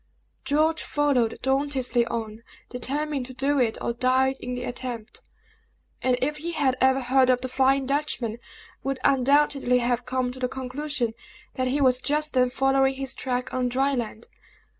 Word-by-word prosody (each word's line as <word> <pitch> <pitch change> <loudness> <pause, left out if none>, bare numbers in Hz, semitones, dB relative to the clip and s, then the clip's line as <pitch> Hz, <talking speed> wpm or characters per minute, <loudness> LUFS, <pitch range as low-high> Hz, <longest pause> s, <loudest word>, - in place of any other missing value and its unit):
George 310 +3 +2
followed 275 -6 +1
dauntlessly 265 -3 +1
on, 225 -1 -5 0.3
determined 275 +2 -2
to 255 - -10
do 275 +2 +1
it 230 -3 +1
or 235 - -1
die 260 +2 +2
in 250 0 -5
the 250 - -5
attempt; 245 -2 -6 0.8
and 255 -1 +2
if 300 +3 -1
he 340 +3 -4
had 275 -5 +1
ever 265 +1 +4
heard 260 +1 +3
of 250 -1 +3
the 255 - -2
Flying 265 +1 +2
Dutchman, 270 -5 -1 0.5
would 270 -1 -2
undoubtedly 275 -1 +3
have 245 0 0
come 255 -1 -1
to 260 - -10
the 250 - 0
conclusion 265 -1 -3 0.4
that 255 -1 -1
he 270 +3 0
was 255 -1 +3
just 300 +2 0
then 250 -1 +3
following 270 +1 +2
his 265 -1 -3
track 250 -2 -3
on 255 -1 0
dry 270 +3 +1
land. 230 -2 -4
260 Hz, 165 wpm, -25 LUFS, 250-275 Hz, 0.8 s, ever